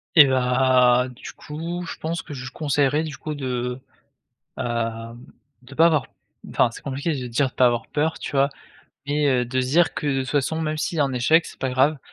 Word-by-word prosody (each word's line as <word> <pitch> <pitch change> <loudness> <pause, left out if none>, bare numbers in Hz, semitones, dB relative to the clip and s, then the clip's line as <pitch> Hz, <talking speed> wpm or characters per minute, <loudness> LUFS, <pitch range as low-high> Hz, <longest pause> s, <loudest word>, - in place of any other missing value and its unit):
Et 150 -3 +10
bah, 125 -1 +3
du 125 - -10
coup 170 +4 -6
je - - -6
pense 165 +1 -3
que - - -10
je 130 -3 -7
lui 130 - -7
conseillerais 145 +1 +1
du 155 -3 -6
coup 155 +6 -5
de, 125 -3 -3 0.8
hem, 115 -1 -3 0.4
de 130 +2 -13
pas 165 +3 +5
avoir 155 -5 +2 0.4
enfin - - +3
c'est - - -11
compliqué 140 +4 -2
de 125 - -5
dire, 125 +3 +1
de - - -34
pas 125 - +4
avoir 120 -1 0
peur, 155 +2 -1
tu - - -5
vois? 140 0 +3 0.6
Mais, 145 +1 +1
heu, 125 -3 +2
de 130 +2 -1
se 125 - -1
dire, 170 +5 +3
que - - -4
de 135 -2 +1
toute 130 - -5
façon 150 +3 0
même 155 -1 -2
s'il 165 +2 -2
y - - +4
a - - +5
un 135 -1 -1
échec 155 +7 +3
c'est - - -12
pas 130 - -2
grave. 135 +4 +3
135 Hz, 230 wpm, -23 LUFS, 125-155 Hz, 0.8 s, Et